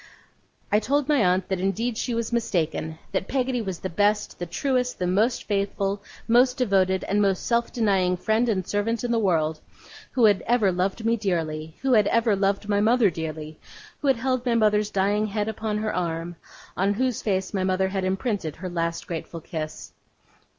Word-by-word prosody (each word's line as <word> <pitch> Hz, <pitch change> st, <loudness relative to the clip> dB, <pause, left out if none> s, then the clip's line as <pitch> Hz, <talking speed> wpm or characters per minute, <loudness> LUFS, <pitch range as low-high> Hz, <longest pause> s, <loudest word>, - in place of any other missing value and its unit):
I 210 Hz, -, +5 dB
told 280 Hz, +5 st, 0 dB
my 290 Hz, -7 st, +3 dB
aunt 180 Hz, 0 st, +2 dB
that 190 Hz, -2 st, -1 dB
indeed 215 Hz, +6 st, -1 dB
she 235 Hz, +1 st, -2 dB
was 230 Hz, 0 st, -2 dB
mistaken. 165 Hz, -8 st, -1 dB
That 190 Hz, 0 st, -1 dB
Peggotty 255 Hz, -2 st, 0 dB
was 190 Hz, -5 st, -4 dB
the -, -, -2 dB
best, 205 Hz, +4 st, 0 dB
the 175 Hz, -, -4 dB
truest, 250 Hz, +6 st, -1 dB
the 180 Hz, -, -1 dB
most 215 Hz, +7 st, +1 dB
faithful, 200 Hz, -1 st, -1 dB, 0.3 s
most 250 Hz, +2 st, +4 dB
devoted, 190 Hz, -6 st, +2 dB
and 205 Hz, +1 st, +1 dB
most 195 Hz, -2 st, +1 dB
self 235 Hz, 0 st, +1 dB
denying 190 Hz, -6 st, +1 dB
friend 220 Hz, +6 st, +1 dB
and 190 Hz, -4 st, -1 dB
servant 215 Hz, +2 st, -1 dB
in 240 Hz, -, -1 dB
the 230 Hz, -, +2 dB
world; 160 Hz, -6 st, +1 dB, 0.5 s
who 245 Hz, -4 st, +4 dB
had 205 Hz, -3 st, +4 dB
ever 230 Hz, -5 st, +3 dB
loved 190 Hz, +5 st, -1 dB
me 230 Hz, +1 st, +2 dB
dearly, 160 Hz, -6 st, -2 dB
who 265 Hz, -1 st, +3 dB
had 210 Hz, -3 st, +5 dB
ever 230 Hz, -2 st, +3 dB
loved 195 Hz, +1 st, 0 dB
my 205 Hz, -1 st, +2 dB
mother 225 Hz, -2 st, +4 dB
dearly; 155 Hz, -1 st, -6 dB, 0.4 s
who 290 Hz, -, -2 dB
had 265 Hz, -3 st, +4 dB
held 255 Hz, 0 st, -1 dB
my 240 Hz, -2 st, +1 dB
mother's 210 Hz, -2 st, +3 dB
dying 205 Hz, +2 st, +1 dB
head 210 Hz, 0 st, -2 dB
upon 220 Hz, -1 st, -2 dB
her 215 Hz, 0 st, -2 dB
arm, 170 Hz, -1 st, -2 dB, 0.4 s
on 200 Hz, +2 st, +1 dB
whose 255 Hz, 0 st, 0 dB
face 190 Hz, -2 st, -1 dB
my 190 Hz, -2 st, 0 dB
mother 190 Hz, 0 st, +1 dB
had 190 Hz, -1 st, -2 dB
imprinted 190 Hz, -, -2 dB
her 185 Hz, +1 st, -6 dB
last 170 Hz, -1 st, -2 dB
grateful 165 Hz, 0 st, -6 dB
kiss. 155 Hz, -1 st, -6 dB
205 Hz, 190 wpm, -25 LUFS, 185-230 Hz, 0.5 s, I